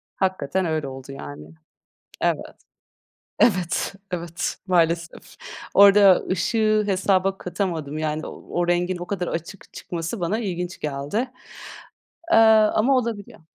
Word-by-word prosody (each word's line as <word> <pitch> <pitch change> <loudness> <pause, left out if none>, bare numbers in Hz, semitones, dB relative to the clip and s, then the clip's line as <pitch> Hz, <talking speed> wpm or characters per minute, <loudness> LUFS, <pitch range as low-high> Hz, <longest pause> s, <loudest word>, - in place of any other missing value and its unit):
Hakikaten 190 -1 -1
öyle 155 -3 -1
oldu 135 0 -9
yani. 75 - -9 0.7
Evet. - - -1 0.8
Evet, 180 +1 +1 0.2
evet. 170 -1 -3
Maalesef. 170 -2 0 0.4
Orada 200 -1 +7
ışığı 215 +3 +2
hesaba 195 0 +1
katamadım, 170 -5 -3
yani 155 0 -2
o 175 0 -4
rengin 175 +1 +1
o 175 - -6
kadar 180 -3 -3
açık 170 +4 -7
çıkması 170 +5 -5
bana 185 +6 -1
ilginç 180 -4 -4
geldi. 145 +5 -4 1.2
Eee, - - +7
ama 220 +3 +5
olabiliyor. 230 -7 -3
180 Hz, 110 wpm, -23 LUFS, 165-200 Hz, 1.2 s, Orada